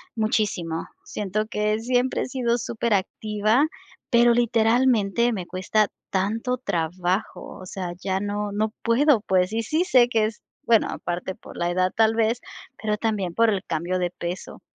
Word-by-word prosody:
muchísimo. 210 -7 -1 0.2
Siento 210 +1 -2
que 210 0 0
siempre 250 +2 +1
he - - -4
sido 240 -2 0
superactiva, 215 +2 0 0.4
pero 235 -1 +5
literalmente 235 -1 +3
me 185 -5 -4
cuesta 205 +4 +1 0.2
tanto 225 +6 0
trabajo. 180 -2 -2
O - - -9
sea, 180 -1 -5
ya 190 -1 -1
no 205 +1 -2
no 215 +1 -1
puedo, 245 +1 +4
pues. 185 -1 +1
Y 230 +1 0
sí 315 +10 0
sé 250 -9 +5
que 225 -3 +2
es 215 0 -5 0.2
bueno, 230 -2 +4
aparte 175 +2 -4
por - - -13
la 175 0 0
edad, 185 +1 +1
tal 220 0 +4
vez, 230 +1 +1 0.4
pero 215 -1 0
también 205 -6 -1
por 230 0 +4
el 200 -3 0
cambio 170 +3 -1
de 175 -1 -1
peso. 175 +1 -6
215 Hz, 160 wpm, -24 LUFS, 190-235 Hz, 0.4 s, pero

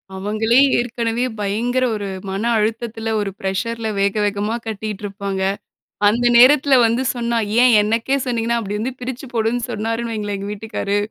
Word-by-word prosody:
அவங்களே 215 +4 +1 0.2
ஏற்கனவே 235 0 -1 0.2
பயங்கர 235 +6 0
ஒரு 205 -2 -4 0.2
மன 195 +1 -3 0.2
அழுத்தத்துல, 225 +1 -2
ஒரு 200 -1 -3
பிரஷர்‌ல 220 +4 -2
வேக, 200 0 +2
வேகமா 205 +2 -1
கட்டிட்டுருப்பாங்க. 200 -2 -4 0.7
அந்த 235 +4 +2
நேரத்துல 270 +2 +6
வந்து 230 +3 +1
சொன்னா, 235 -1 -1 0.3
"ஏன் 250 -2 +6
எனக்கே 230 +6 0
சொன்னீங்கன்னா?" 235 -1 0
அப்படி 205 0 -4
வந்து 250 +4 -3
"பிரிச்சு 255 +2 -5
போடுன்னு 230 +1 0
சொன்னார்ன்னு 230 +1 -2
வைங்களேன் 205 -2 -3
எங்க 200 +1 -5
வீட்டுக்காரு," 205 -1 -3
225 Hz, 140 wpm, -20 LUFS, 205-235 Hz, 0.7 s, நேரத்துல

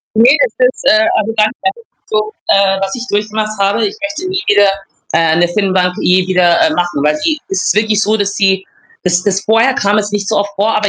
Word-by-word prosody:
Ne, 240 +6 +5
das 255 - +1
ist 255 - -8
äh, 215 +1 +3
also, 215 +1 -1
ganz 215 0 +3
ehrlich 450 +5 -3 0.2
so 435 -1 -1 0.2
äh, 195 -1 +3
was 195 0 -3
ich 245 - -5
durchgemacht 215 +1 -2
habe. 200 - +1
Ich 405 +1 -6
möchte 310 +5 -4
nie 375 0 -2
wieder, 205 -1 +4 0.4
äh, 165 -1 +2
'ne 175 0 +2
Firmenbank 185 -1 0
je 180 0 +2
wieder, 180 -2 +2
äh, - - +3
machen, 175 -5 -2
weil 150 +1 +1
die 310 -2 0
es 390 - -2
ist - - +2
wirklich 215 -1 +1
so, 215 0 +1
dass 200 -1 -1
sie 190 -1 +1 0.4
das 180 0 0
das 195 -1 0
vorher 225 +6 +2
kam 205 -1 +1
es 205 -1 -3
nicht 200 -1 -3
so 220 - 0
oft 200 0 -1
vor, 210 +3 0
aber 210 -1 0
205 Hz, 230 wpm, -13 LUFS, 190-225 Hz, 0.4 s, Ne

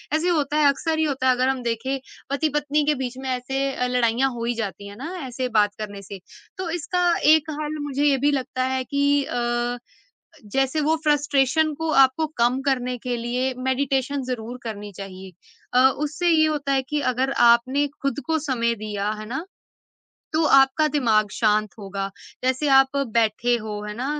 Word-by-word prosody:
ऐसे 330 +3 +1
होता 300 -3 +1
है, 305 - +4
अक्सर 320 +3 -1
ही - - +3
होता 270 -3 -1
है। 255 - +6
अगर 255 +1 +1
हम 265 -1 -1
देखें, 235 +3 -2 0.3
पति-पत्नी 295 0 0
के 300 0 +2
बीच 255 -1 -4
में 265 0 -5
ऐसे 255 +1 -2
अ, 250 - -1
लड़ाइयाँ 250 +1 +2
हो 235 -1 -5
ही 240 - 0
जाती 205 -2 -5
हैं। - - -9
हैं 200 - -12
ना? 315 +9 -6
ऐसे 255 +1 -3
बात 205 -1 +3
करने 205 -2 -6
से। 200 0 -9 0.4
तो 370 -2 -4
इसका 350 +2 -1 0.3
एक 315 0 +2
हल 305 0 -3
मुझे 285 -1 -2
ये 280 -2 +4
भी 290 - +4
लगता 260 -1 -2
है 260 - -1
कि 285 +2 +1
अ, 240 -1 -1 0.7
जैसे 270 +7 0
वो 310 +2 +2
फ्रस्ट्रेशन 295 +1 +2
को 320 +2 -2
आपको 265 +5 0
कम 240 +3 +2
करने 255 -2 0
के 245 +1 -3
लिए 245 +3 -1
मेडिटेशन 265 +1 0
ज़रूर 245 -1 -5
करनी 210 -3 -6
चाहिए। 190 -1 -9 0.4
अ, 255 +1 +6
उससे 300 +5 -2
ये 315 -2 +5
होता 290 -3 -1
है 270 -1 +2
कि 300 0 -1
अगर 265 +2 0 0.2
आपने 255 +5 +2 0.2
खुद 275 +1 -1
को 320 -1 +1
समय 250 -6 0
दिया, 205 -1 -2
है 215 - -7
ना? 270 +8 -4 0.9
तो 315 +1 +3
आपका 275 +1 +5
दिमाग 225 -8 +2
शांत 215 -2 +1
होगा। 195 -1 -4 0.4
जैसे 260 +3 +1
आप 270 +1 +4 0.2
बैठे 230 +1 +2
हो, 215 -2 -6
है - - -4
ना? 250 +3 -3
260 Hz, 190 wpm, -23 LUFS, 235-290 Hz, 0.9 s, है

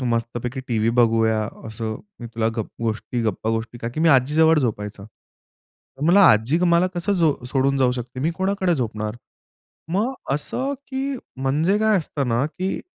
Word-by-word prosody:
मस्तपैकी 120 +1 -2
टीव्ही 115 -1 +1
बघूया" 110 -1 +3 0.3
असं, 110 0 -4 0.2
"मी 120 - -6
तुला 115 -1 +1
गप 110 - -3
गोष्टी, 115 +2 -2
गप्पा-गोष्टी" 115 +2 -2
का 115 - -4
की 120 +6 -5
मी 165 - +4
आजी 135 +1 +4
जवळ 160 0 +5
झोपायचा, 105 -5 -3 0.9
तर 145 - -7
मला 195 +4 +6
आजी 115 +10 +2
मला 170 +1 +4
कसं 180 +4 0
जो 165 -6 +3
सोडून 135 +1 +1
जाऊ 125 -2 +3
शकते? 125 +1 -6
मी 160 +5 +1
कोणाकडे 190 -2 +1
झोपणार? 110 -4 -3 0.7
मग 200 +6 +1 0.2
अ, - - +2
असं 260 - -2
की 270 +1 -3 0.2
म्हणजे 150 +10 +1
काय 220 -1 +3
असतं 145 -5 -3
ना, 120 +3 +1
की 185 +4 -3
130 Hz, 165 wpm, -22 LUFS, 115-170 Hz, 0.9 s, मला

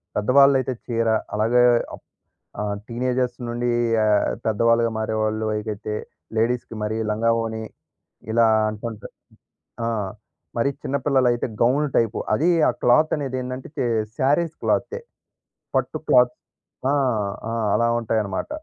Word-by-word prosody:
పెద్దవాళ్ళైతే 130 +3 +4
చీర, 115 -2 -1 0.3
అలాగే 115 +3 +3 0.3
అప్ - - -20 0.6
ఆహ్, 105 -1 -2
టీనేజర్స్ 125 +1 -1
నుండీ 120 +1 -1 0.3
ఆహ్, 105 -1 +3 0.2
పెద్దవాళ్ళుగా 115 +1 +3
మారేవాళ్ళు 110 0 -1
అయిగతే 105 0 -4 0.4
లేడీస్‌కి 115 +1 0
మరీ 110 +1 -2
లంగావోణి, 115 0 0 0.7
ఇలా 115 0 +4 0.2
అంటంటా 110 0 -7 0.8
ఆ! - - 0 0.7
మరి 120 +4 +2
చిన్నపిల్లలైతే 130 -3 +1
గౌన్లు 140 +5 +3
టైపు. 115 -1 +1
అదీ, 150 +11 +2 0.2
ఆ - - +5
క్లాత్తనేదేందంటే 130 -2 +1
చే - - 0 0.3
శారీస్ 155 +5 +1
క్లాత్తే. 470 - 0 0.8
పట్టు - - 0
క్లాత్ 125 -1 +5 0.6
ఆ! - - +2 0.6
ఆ! - - -3 0.2
అలా 115 - +2
ఉంటాయనమాట. 110 -4 -2
115 Hz, 105 wpm, -23 LUFS, 110-130 Hz, 0.8 s, ఆ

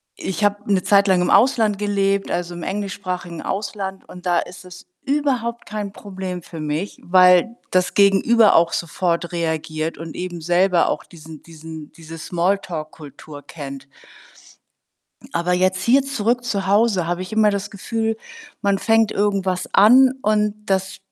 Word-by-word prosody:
ich 190 +2 -4
habe 205 0 0
'ne 185 -2 +2
Zeit 200 0 +4
lang 185 -2 +3
im 180 - +1
Ausland 220 -5 +3
gelebt, 200 -1 0
also, 175 0 -2
im 175 - -7
englischsprachigen 185 -3 -4
Ausland. 195 -1 -5
Und 180 0 -12
da 175 -1 +3
ist 180 +1 -8
es 180 0 -13 0.2
überhaupt 260 -5 -1
kein 210 -2 -5
Problem 190 -3 -7
für 165 -1 -10
mich, 155 +6 -4
weil 180 +5 +4
das 185 -1 +1
Gegenüber 205 +3 +4
auch 170 0 +4
sofort 170 +1 -2
reagiert 160 -1 -3
und 165 -1 -8
eben 180 -1 -5
selber 175 +2 +2
auch - - -2
diesen 160 -3 -13
diesen 160 -2 -11
diese 165 0 -11
Smalltalk-Kultur 155 -5 -4
kennt. 140 -2 -9 1.5
Aber 170 +1 0
jetzt 185 +1 +1
hier 260 +6 +4
zurück 245 -3 -1
zu 200 -5 -2
Hause 200 -3 +2
habe 175 +1 -2
ich 185 - -7
immer 215 -1 +3
das 200 0 -3
Gefühl, 225 +2 -3 0.4
man 200 -1 +1
fängt 225 -1 +3
irgendwas 195 -3 -1
an 255 +6 +6
und 210 0 +1
das 190 -1 -1
190 Hz, 150 wpm, -21 LUFS, 170-205 Hz, 1.5 s, an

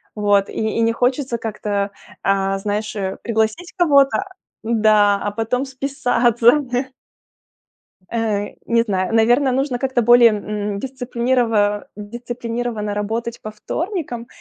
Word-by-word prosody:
Вот 205 -2 +2
и - - -9 0.2
и - - +2
не 230 0 +3
хочется 250 +1 0
как-то, 205 -2 -3 0.3
а, 195 0 +1
знаешь, 210 +2 -3
э, 190 -2 -3
пригласить 220 +9 -1
кого-то, 290 0 +4 0.4
да, 215 -3 +3
а 205 - -1
потом 230 +5 -1
списаться. 265 -3 0 1.7
Э, 215 -3 -1 0.2
не 230 0 +3
знаю, 190 -2 -1
наверно, 240 +4 +4
нужно 260 -1 -1
как-то 260 -2 0
более, 240 0 +7
м, 210 -1 -3
дисциплинирова 240 -4 0
дисциплинированно 230 0 -4
работать 225 +3 -3
по 215 - -6
вторникам, 280 - -4
230 Hz, 115 wpm, -20 LUFS, 210-245 Hz, 1.7 s, более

